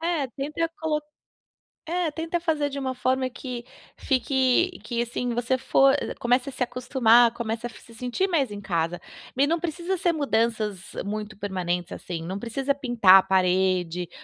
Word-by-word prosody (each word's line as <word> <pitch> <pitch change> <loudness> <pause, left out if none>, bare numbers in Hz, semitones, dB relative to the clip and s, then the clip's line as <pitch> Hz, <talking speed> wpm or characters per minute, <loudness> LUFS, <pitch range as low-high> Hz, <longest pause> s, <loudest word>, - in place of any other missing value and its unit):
É, 330 -4 0
tenta 295 +6 -3
colo 305 -2 0 0.9
é, 345 -2 0
tenta 330 +2 -2
fazer 310 -4 0
de 280 - -6
uma 260 -1 -2
forma 255 +1 0
que 245 -1 -7 0.3
fique 265 +6 +1
que 235 -1 -2
assim 240 +1 -2
você 245 +2 0
for 270 +1 +4 0.2
comece 250 +3 +1
a - - -7
se 260 - -11
acostumar, 240 -2 +4
começa 230 0 -3
a - - -10
se 230 -1 -15
sentir 250 - -1
mais 285 - +1
em 205 - -6
casa, 170 -3 -1 0.4
e 280 - +4
não 335 +3 +2
precisa 345 +3 -2
ser 345 0 +2
mudanças 220 - -1
muito 210 0 -5
permanentes, 180 -3 -3
assim, 170 -2 -6
não 190 +4 -4
precisa 270 +5 -1
pintar 240 -8 +5
a - - +1
parede 180 -2 +1
245 Hz, 165 wpm, -25 LUFS, 210-285 Hz, 0.9 s, pintar